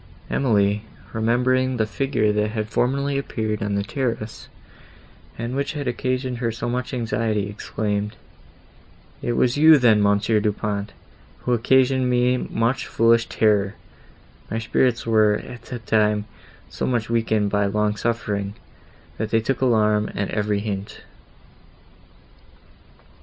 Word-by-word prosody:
Emily, 105 -5 +2 0.3
remembering 125 +3 +1
the 110 - +2
figure 110 -1 0
that 105 0 +1
had 110 -1 -3
formerly 140 +5 0
appeared 110 -5 -3
on 105 0 -1
the 100 - 0
terrace, 115 -2 -4 0.9
and 120 +2 -4
which 140 +3 -1
had 145 -2 -4
occasioned 130 0 -2
her 115 -2 0
so 115 - -4
much 125 +1 -2
anxiety, 115 -4 -1
exclaimed, 105 0 -3 1.1
"It 120 - -1
was 125 +2 +2
you 155 +1 +8
then, 115 -5 +4
Monsieur 105 +2 +2
Du 105 0 +1
Pont, 100 0 -3 0.5
who 125 - 0
occasioned 130 +2 +3
me 125 0 +3
much 115 +1 -1
foolish 115 0 +3
terror; 105 -2 +2 0.7
my 110 - -2
spirits 115 +2 +1
were, 110 -2 +4
at 120 +2 -8
that 120 -3 -7
time, 105 -1 +2 0.4
so - - -4
much 120 -3 0
weakened 110 -3 +1
by 100 -1 +2
long 105 +1 0
suffering, 105 -3 -2 0.6
that 110 0 -2
they 115 - +3
took 130 +5 -2
alarm 105 -4 +2
at 100 - -2
every 105 -1 0
hint." 100 -1 -5
110 Hz, 135 wpm, -23 LUFS, 105-125 Hz, 1.1 s, you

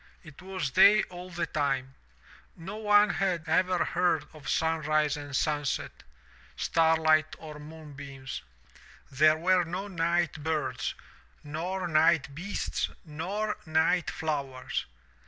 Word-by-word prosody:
It 155 0 -13
was 185 -7 -3
day 200 +4 +7
all 180 +1 -8
the 175 -1 -2
time. 135 -4 -1 0.6
No 190 +5 -7
one 210 -2 +5
had 175 -4 -1
ever 180 +2 +2
heard 170 -4 +1
of 150 -3 -9
sunrise 155 -2 +1
or 145 -1 -7
sunset, 145 0 0 0.7
starlight 160 -1 +3
or 155 -2 -9
moonbeams. 145 -3 -8 0.7
There 155 +3 +5
were 180 +2 +3
no 180 +4 -4
night 170 -4 0
birds, 150 -5 -2 0.5
nor 175 +5 -3
night 155 -3 +3
beasts, 180 +8 -3 0.2
nor 190 +8 -3
night 160 +2 +2
flowers. 140 -5 -3
160 Hz, 115 wpm, -29 LUFS, 150-180 Hz, 0.7 s, day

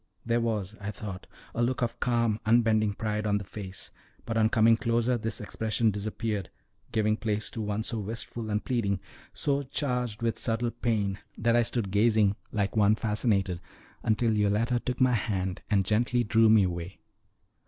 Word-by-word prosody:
There 115 +1 +1
was, 110 -3 -2
I 100 - -3
thought, 100 -2 -7 0.3
a 120 - -1
look 120 +1 +1
of 120 0 -2
calm, 115 -3 +1
unbending 110 -2 +3
pride 105 0 -2
on 105 0 +2
the 100 - -4
face, 95 -1 -7 0.3
but 115 - -3
on 110 -1 +4
coming 115 0 +5
closer 115 +2 +1
this 115 0 -3
expression 110 +1 0
disappeared, 105 0 -3 0.4
giving 110 -1 +2
place 105 -1 -2
to 115 - -4
one 105 +1 -2
so 115 0 -2
wistful 110 +2 -5
and 105 0 -1
pleading, 100 -6 0 0.3
so 140 -1 0
charged 125 -5 -2
with 115 -1 0
subtle 115 +1 0
pain, 105 -4 -1 0.2
that 115 +1 +2
I 120 - +5
stood 115 -4 -1
gazing 105 -1 +3 0.2
like 100 -2 -1
one 105 0 +5
fascinated, 105 -5 0 0.4
until 110 0 +1
Yoletta 105 +4 +2
took 125 +1 -3
my 130 -1 +4
hand 95 -4 -1
and 100 -3 +2
gently 120 +4 +2
drew 115 0 +4
me 110 -2 +6
away. 90 0 -3
110 Hz, 170 wpm, -28 LUFS, 105-115 Hz, 0.4 s, me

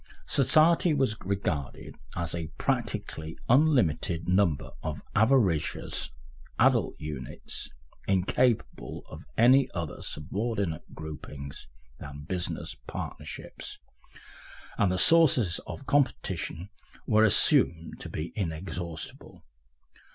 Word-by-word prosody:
Society 155 +4 +4
was 135 -6 +1
regarded 90 -8 -3 0.2
as 85 -1 -2
a 85 -2 -3
practically 80 0 -2
unlimited 115 - +3
number 90 -6 +2
of 75 -1 -5
avaricious 110 - +2 0.5
adult - - +3
units 75 -4 -5 0.4
incapable 95 - 0
of - - -10
any 130 +4 +6
other 85 -4 -4
subordinate 95 +1 -3
groupings 75 -2 -8 0.3
than 70 +1 -8
business 90 +3 -3
partnerships, - - -7 1.0
and 100 - +2
the 95 - 0
sources 130 - +5
of 140 - -7
competition 125 - 0 0.3
were 110 0 +4
assumed 85 -5 +4
to - - -6
be 80 +2 -5
inexhaustible. 85 -3 -5
90 Hz, 90 wpm, -28 LUFS, 80-120 Hz, 1.0 s, any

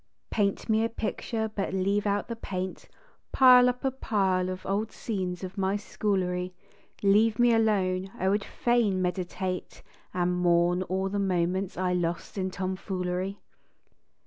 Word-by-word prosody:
Paint 200 -2 0
me 220 0 +3
a 230 - +1
picture 225 0 -3
but 195 -2 -2
leave 200 +2 +1
out 205 0 0
the 230 - -4
paint, 185 -4 -5 0.4
Pile 250 -1 +7
up 250 +1 -4
a 265 - +2
pile 190 -7 0
of 185 0 -6
old 210 +3 -1
scenes 185 -5 -4
of 185 +2 -6
my 190 +1 +1
schoolery, 185 -3 -1 0.5
Leave 210 +2 +4
me 240 -1 +5
alone; 195 -4 +1
I 190 - -1
would 200 +1 +2
fain 235 -6 +1
meditate 180 0 -3 0.3
And 180 0 0
mourn 175 0 +3
o 190 +1 0
er - - -1
the 200 +1 -2
moments 185 0 0
I 180 0 0
lost 175 -1 -2
in 190 -2 -1
tomfoolery. 185 0 -3
190 Hz, 150 wpm, -28 LUFS, 185-210 Hz, 0.5 s, Pile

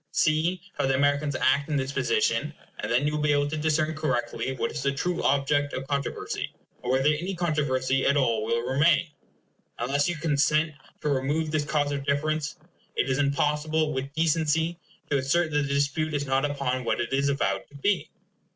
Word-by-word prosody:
See 165 +3 +1 0.2
how - - +2
the 135 - +2
Americans 145 +1 +1
act 140 +3 +2
in 150 - 0
this 135 0 -1
position, 445 - 0 0.2
and - - -3
then 125 +4 +3
you 150 - 0
will 150 - -1
be 150 -1 +3
able 145 0 +2
to 150 - -3
discern 155 0 +1
correctly 130 -5 -1
what - - -2
is 150 - -4
the 140 +1 +1
true 175 +5 -1
object 145 +1 +1
of 130 - -2
the - - -14
controversy, 140 -1 -3 0.3
or 125 - -5
whether 135 +3 +3
any 175 +6 -1
controversy 135 -6 +1
at 140 - +3
all 115 -5 +2
will 115 +2 -1
remain. 155 +5 +3 0.7
Unless 140 +6 +1
you 175 - -1
consent 155 0 +2 0.3
to 150 - -1
remove 145 +3 0
this 155 -2 0
cause 145 -1 0
of 140 -1 -2
difference, 150 +2 -1 0.4
it 135 - +1
is 130 - 0
impossible, 150 +2 +1
with 130 +1 -3
decency, 160 +1 +1 0.3
to 140 - +4
assert 155 +5 +1
that 145 - +1
the 140 - -1
dispute 145 +2 0
is 145 0 -1
not 135 +1 +1
upon 140 -3 -1
what - - 0
it - - -2
is 140 +1 +2
avowed 100 -8 -1
to 145 - -18
be. 195 +8 0
145 Hz, 195 wpm, -26 LUFS, 135-155 Hz, 0.7 s, to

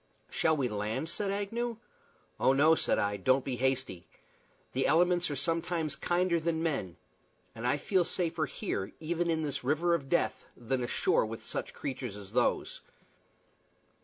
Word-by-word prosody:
"Shall 160 -1 +2
we 135 -3 +1
land?" 110 +7 -2
said 200 +3 -2
Agnew. 225 +4 -2 0.6
"Oh 130 - +4
no," 150 +4 +6
said - - +2
I. 100 0 0
"Don't 130 +6 +2
be 130 -2 -2
hasty. 130 -8 -1 0.7
The 130 +1 +1
elements 175 +1 +3
are 145 - -2
sometimes 165 0 -1
kinder 175 +3 +1
than 165 0 -1
men, 120 - -2 0.6
and 115 +2 -3
I 140 - +3
feel 185 +4 +2
safer 165 -3 -1
here, 100 -5 -3
even 170 +2 -1
in 160 -1 +1
this 145 -3 -2
river 155 +6 +2
of 140 -5 -1
death, 175 - +1
than 125 +2 -1
ashore 120 -2 +2
with 110 0 -7
such - - -5
creatures 130 -6 -4
as 100 -2 -11
those." - - +1
150 Hz, 160 wpm, -31 LUFS, 125-170 Hz, 0.7 s, no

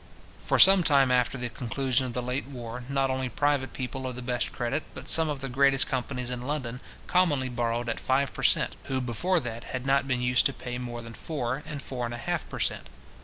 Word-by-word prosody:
For - - +1
some 195 -1 +9
time 140 -5 +4
after 125 +1 +2
the 125 0 -3
conclusion 130 +2 -1
of 120 - -6
the 125 +1 -2
late 125 +2 -2
war, 125 -2 -7
not 135 -1 +1
only 130 -1 -2
private 145 +1 0
people 130 0 -4
of 125 - -5
the 125 - -7
best 125 0 -1
credit, 120 +6 -2
but - - -7
some 160 -1 +4
of 145 -2 -3
the 135 - -3
greatest 135 +1 +4
companies 125 -1 -3
in 125 -1 -4
London, 125 -2 -3 0.2
commonly 150 -8 +2
borrowed 120 -1 -1
at 115 - -2
five 135 +1 +1
per - - -6
cent. - - +3
who, 130 - -1
before 145 +10 0
that, 115 -2 -6
had 125 0 -5
not 140 0 +2
been 130 -2 0
used 125 0 +4
to 140 - -5
pay 125 -1 -6
more 120 -1 -6
than 115 0 -9
four, 130 -1 -3
and 150 -3 -6
four 125 -2 -4
and 120 0 -4
a - - -6
half - - -3
per - - -6
cent. - - -1
130 Hz, 230 wpm, -28 LUFS, 120-140 Hz, 0.2 s, some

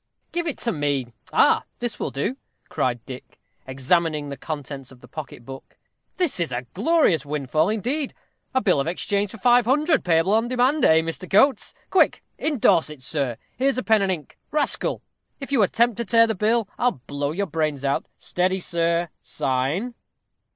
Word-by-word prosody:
"Give 345 0 -2
it 295 - -3
me. 145 - -1 0.2
Ah! - - +4
this 240 -2 -3
will - - -2
do," 175 - -2 0.3
cried 120 -2 -1
Dick, 130 -1 -10 0.3
examining 150 +3 0
the 140 - -5
contents 140 -3 -7
of 130 - -15
the 125 - -15
pocket 135 -3 -9
book. 135 +1 -11 0.4
"This 350 - +1
is 170 -5 -1
a 120 +1 -3
glorious 210 - +3
windfall 150 +3 0
indeed; 250 +7 -2 0.4
a 260 - +1
bill 180 - +3
of 140 - -1
exchange 200 +4 -1
for 225 - -9
500_l._, 250 - +3
payable 170 +3 +3
on 225 +2 +2
demand, 255 +4 +2
eh, 160 0 +6
Mr. 165 +3 -5
Coates? 265 +8 +3 0.2
Quick! 380 - +3 0.2
indorse 205 - +3
it, 150 -4 -10
sir. 135 -5 -1 0.2
Here's 265 0 +1
pen 220 -2 +3
and 195 -1 +1
ink. 155 -6 -6
Rascal! 300 -1 0 0.4
if 275 -1 -7
you 265 -5 +4
attempt 230 +3 +2
to 235 - -2
tear 230 0 +5
the 225 - 0
bill, 220 +2 +1
I'll 245 - +1
blow 145 0 -2
your 200 +5 -1
brains 155 -5 -2
out. 140 - 0
Steady, 185 +1 -1
sir, 170 -1 0
sign. 135 - -1
180 Hz, 170 wpm, -23 LUFS, 145-240 Hz, 0.4 s, eh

